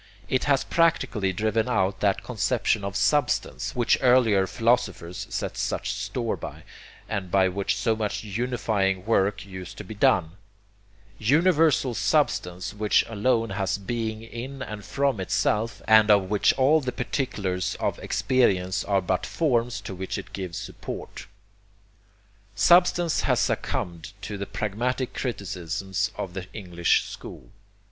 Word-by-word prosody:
It 130 Hz, -, 0 dB
has 140 Hz, -2 st, +3 dB
practically 130 Hz, -, +1 dB
driven 110 Hz, +4 st, 0 dB
out 95 Hz, -4 st, +1 dB
that 100 Hz, -2 st, +1 dB
conception 110 Hz, -1 st, 0 dB
of 100 Hz, 0 st, -4 dB
'Substance' 125 Hz, +7 st, +1 dB
which 120 Hz, -2 st, +2 dB
earlier 120 Hz, -7 st, +4 dB
philosophers 100 Hz, -5 st, 0 dB
set -, -, -3 dB
such -, -, -2 dB
store -, -, -2 dB
by, -, -, -8 dB, 0.4 s
and 100 Hz, -4 st, -3 dB
by 95 Hz, 0 st, +4 dB
which 95 Hz, +1 st, -1 dB
so 110 Hz, +2 st, +1 dB
much 105 Hz, -1 st, -3 dB
unifying 105 Hz, -4 st, -1 dB
work 100 Hz, -3 st, +1 dB
used 95 Hz, -1 st, -9 dB
to -, -, -6 dB
be 105 Hz, -, -8 dB
done 90 Hz, -4 st, +2 dB, 0.8 s
universal 150 Hz, -, +3 dB
substance 90 Hz, -3 st, 0 dB
which 105 Hz, 0 st, +2 dB
alone 115 Hz, +1 st, +1 dB
has 100 Hz, -1 st, -1 dB
being 110 Hz, +2 st, -3 dB
in 130 Hz, +4 st, -7 dB
and 105 Hz, -4 st, -7 dB
from 140 Hz, -4 st, 0 dB
itself, 105 Hz, +4 st, 0 dB
and 110 Hz, -1 st, +6 dB
of 100 Hz, -2 st, +4 dB
which 105 Hz, -, +4 dB
all 140 Hz, +4 st, +4 dB
the 130 Hz, -2 st, -2 dB
particulars 105 Hz, -8 st, -2 dB
of -, -, -1 dB
experience 95 Hz, -8 st, +1 dB
are 100 Hz, -1 st, +1 dB
but 90 Hz, +1 st, 0 dB
forms 120 Hz, -7 st, 0 dB
to -, -, -7 dB
which 95 Hz, 0 st, -4 dB
it -, -, -9 dB
gives 90 Hz, -4 st, -5 dB
support. -, -, -7 dB, 1.3 s
Substance 175 Hz, -, +4 dB
has -, -, +2 dB
succumbed 85 Hz, 0 st, -2 dB
to 105 Hz, -, -4 dB
the 100 Hz, 0 st, -5 dB
pragmatic 120 Hz, +5 st, -2 dB
criticisms 100 Hz, -3 st, -3 dB
of 90 Hz, -, -4 dB
the 95 Hz, -1 st, -6 dB
English 90 Hz, -5 st, +1 dB
school. -, -, -10 dB
105 Hz, 140 wpm, -25 LUFS, 95-125 Hz, 1.3 s, and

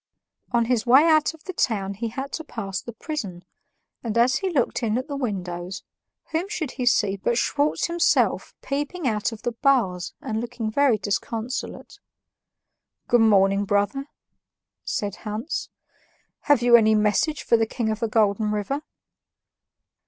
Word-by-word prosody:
On 235 Hz, -1 st, +2 dB
his 235 Hz, -2 st, +1 dB
way 265 Hz, +5 st, +7 dB
out 310 Hz, 0 st, +3 dB
of 315 Hz, -, -22 dB
the 370 Hz, -, -6 dB
town 200 Hz, -, 0 dB
he 225 Hz, +4 st, -4 dB
had 265 Hz, +5 st, -5 dB
to 320 Hz, -, -4 dB
pass 195 Hz, -, -5 dB
the 235 Hz, -, -8 dB
prison, 210 Hz, -, -6 dB, 0.6 s
and 230 Hz, -1 st, -2 dB
as 250 Hz, +3 st, +4 dB
he 385 Hz, -, -2 dB
looked 270 Hz, -7 st, 0 dB
in 225 Hz, -1 st, 0 dB
at 255 Hz, +2 st, -3 dB
the 285 Hz, -, -4 dB
windows, 185 Hz, -7 st, -4 dB, 0.5 s
whom 335 Hz, +5 st, -1 dB
should 330 Hz, -10 st, -3 dB
he 250 Hz, -2 st, -3 dB
see 205 Hz, -4 st, +3 dB
but 235 Hz, +4 st, 0 dB
Schwartz 290 Hz, +4 st, +1 dB
himself 340 Hz, 0 st, +1 dB
peeping 290 Hz, +3 st, -3 dB
out 215 Hz, -1 st, 0 dB
of 225 Hz, -1 st, -10 dB
the 240 Hz, -, -1 dB
bars 230 Hz, -8 st, +1 dB
and 220 Hz, 0 st, -3 dB
looking 235 Hz, -2 st, -4 dB
very 275 Hz, -2 st, +3 dB
disconsolate. 225 Hz, +4 st, -4 dB, 1.1 s
"Good 240 Hz, -1 st, +5 dB
morning, 200 Hz, -2 st, +4 dB
brother," 205 Hz, +8 st, 0 dB, 0.8 s
said 205 Hz, -2 st, -3 dB
Hans; 215 Hz, +8 st, -4 dB, 0.8 s
"have 280 Hz, -5 st, +5 dB
you 240 Hz, -1 st, +7 dB
any 220 Hz, -2 st, +5 dB
message 215 Hz, +9 st, +1 dB
for -, -, +3 dB
the 225 Hz, -1 st, +2 dB
King 220 Hz, -1 st, -2 dB
of 215 Hz, -, -3 dB
the 230 Hz, -, 0 dB
Golden 215 Hz, -1 st, +2 dB
River?" 210 Hz, +7 st, -2 dB
230 Hz, 160 wpm, -24 LUFS, 210-275 Hz, 1.1 s, way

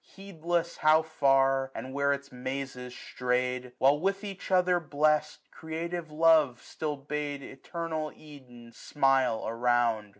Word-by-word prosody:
Heedless 175 Hz, -3 st, -3 dB
how 155 Hz, +1 st, +4 dB
far, 135 Hz, -3 st, +2 dB
and 130 Hz, -, -6 dB
where 140 Hz, 0 st, +1 dB
its 140 Hz, 0 st, -4 dB
mazes 125 Hz, 0 st, -5 dB
stray'd 125 Hz, 0 st, -1 dB
j 125 Hz, 0 st, -13 dB
While, 140 Hz, +3 st, +4 dB
with 195 Hz, +4 st, -1 dB
each 195 Hz, -2 st, -7 dB
other 180 Hz, -1 st, +3 dB
blest, 150 Hz, -1 st, 0 dB
creative 165 Hz, +1 st, -5 dB
love 155 Hz, -5 st, +4 dB
Still 150 Hz, -2 st, -4 dB
bade 145 Hz, 0 st, -4 dB
eternal 160 Hz, +3 st, -5 dB
Eden 125 Hz, -6 st, -14 dB
smile 135 Hz, -3 st, +1 dB
around. 115 Hz, -2 st, +1 dB
145 Hz, 130 wpm, -29 LUFS, 130-160 Hz, -, how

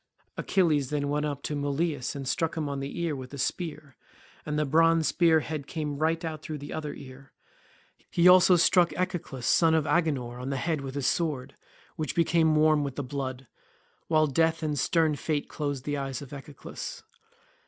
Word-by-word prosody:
Achilles 155 Hz, -8 st, +1 dB
then 145 Hz, -1 st, -1 dB
went 150 Hz, +1 st, 0 dB
up 145 Hz, -1 st, -5 dB
to 150 Hz, -, -3 dB
Mulius 145 Hz, 0 st, -1 dB
and 135 Hz, -2 st, -5 dB
struck 165 Hz, +5 st, -1 dB
him 155 Hz, -2 st, -1 dB
on 140 Hz, -1 st, -3 dB
the 140 Hz, +4 st, -5 dB
ear 165 Hz, -3 st, -1 dB
with 130 Hz, +1 st, -8 dB
a -, -, -8 dB
spear, 150 Hz, 0 st, -4 dB, 0.5 s
and 150 Hz, 0 st, -1 dB
the 150 Hz, -, +1 dB
bronze 165 Hz, +2 st, +3 dB
spear 165 Hz, -2 st, +4 dB
head 150 Hz, -2 st, -5 dB
came 150 Hz, -3 st, -4 dB
right 165 Hz, +2 st, 0 dB
out 160 Hz, -1 st, -6 dB
at 155 Hz, -1 st, -4 dB
the 145 Hz, -, -7 dB
other 150 Hz, -2 st, -4 dB
ear. 135 Hz, 0 st, -13 dB, 0.8 s
He 175 Hz, +1 st, +4 dB
also 180 Hz, 0 st, +7 dB
struck 175 Hz, 0 st, +4 dB
Echeclus 175 Hz, -8 st, -3 dB
son 165 Hz, -1 st, +4 dB
of 155 Hz, -2 st, +1 dB
Agenor 135 Hz, -9 st, 0 dB
on 130 Hz, -, -4 dB
the 135 Hz, -, -1 dB
head 155 Hz, +2 st, -1 dB
with 135 Hz, 0 st, -6 dB
his 140 Hz, -2 st, -2 dB
sword, 140 Hz, -5 st, -1 dB, 0.4 s
which 155 Hz, -, -3 dB
became 165 Hz, -1 st, +3 dB
warm 155 Hz, -1 st, +4 dB
with 140 Hz, -2 st, -4 dB
the 145 Hz, -, -3 dB
blood, 130 Hz, -1 st, -5 dB, 0.6 s
while 155 Hz, -1 st, +4 dB
death 160 Hz, +3 st, +1 dB
and 150 Hz, -2 st, -1 dB
stern 160 Hz, +2 st, +2 dB
fate 150 Hz, -1 st, -2 dB
closed 145 Hz, -3 st, -4 dB
the 145 Hz, -1 st, -1 dB
eyes 135 Hz, 0 st, -4 dB
of 140 Hz, -, -11 dB
Echeclus. 140 Hz, +1 st, -8 dB
150 Hz, 190 wpm, -28 LUFS, 140-160 Hz, 0.8 s, also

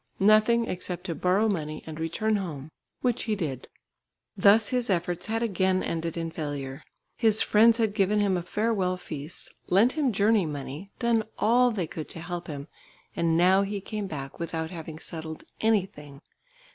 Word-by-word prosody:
Nothing 215 Hz, +3 st, +5 dB
except 180 Hz, -1 st, -4 dB
to 180 Hz, -3 st, -3 dB
borrow 185 Hz, +7 st, +2 dB
money 155 Hz, -7 st, -3 dB
and 160 Hz, 0 st, -7 dB
return 210 Hz, +7 st, 0 dB
home, 155 Hz, -6 st, -6 dB, 0.3 s
which 245 Hz, -2 st, 0 dB
he 220 Hz, -2 st, 0 dB
did. 145 Hz, -10 st, -4 dB, 0.7 s
Thus 210 Hz, +1 st, +5 dB
his 250 Hz, -3 st, -1 dB
efforts 175 Hz, -1 st, -1 dB
had 225 Hz, +1 st, -1 dB
again 190 Hz, -3 st, +1 dB
ended 165 Hz, 0 st, -3 dB
in 165 Hz, -1 st, -3 dB
failure. 140 Hz, -4 st, -5 dB, 0.4 s
His 220 Hz, -3 st, +4 dB
friends 225 Hz, +2 st, +5 dB
had 220 Hz, -3 st, +1 dB
given 205 Hz, 0 st, +2 dB
him 200 Hz, -2 st, +2 dB
a 175 Hz, -, -1 dB
farewell 190 Hz, -1 st, 0 dB
feast, 155 Hz, -3 st, -7 dB
lent 210 Hz, +7 st, +4 dB
him 295 Hz, -5 st, +1 dB
journey 205 Hz, -2 st, +3 dB
money, 145 Hz, +5 st, -6 dB
done 235 Hz, -2 st, +2 dB
all 245 Hz, +3 st, +4 dB
they 205 Hz, -7 st, -2 dB
could 155 Hz, -1 st, -7 dB
to -, -, -7 dB
help 175 Hz, +1 st, -5 dB
him, 145 Hz, -1 st, -6 dB, 0.5 s
and 165 Hz, -1 st, +2 dB
now 185 Hz, +3 st, +5 dB
he 200 Hz, +1 st, -2 dB
came 210 Hz, +1 st, -5 dB
back 135 Hz, -6 st, -7 dB
without 165 Hz, -1 st, -3 dB
having 160 Hz, -3 st, -7 dB
settled 160 Hz, -1 st, -7 dB, 0.2 s
anything. 180 Hz, -10 st, -1 dB
185 Hz, 170 wpm, -27 LUFS, 160-215 Hz, 0.7 s, Nothing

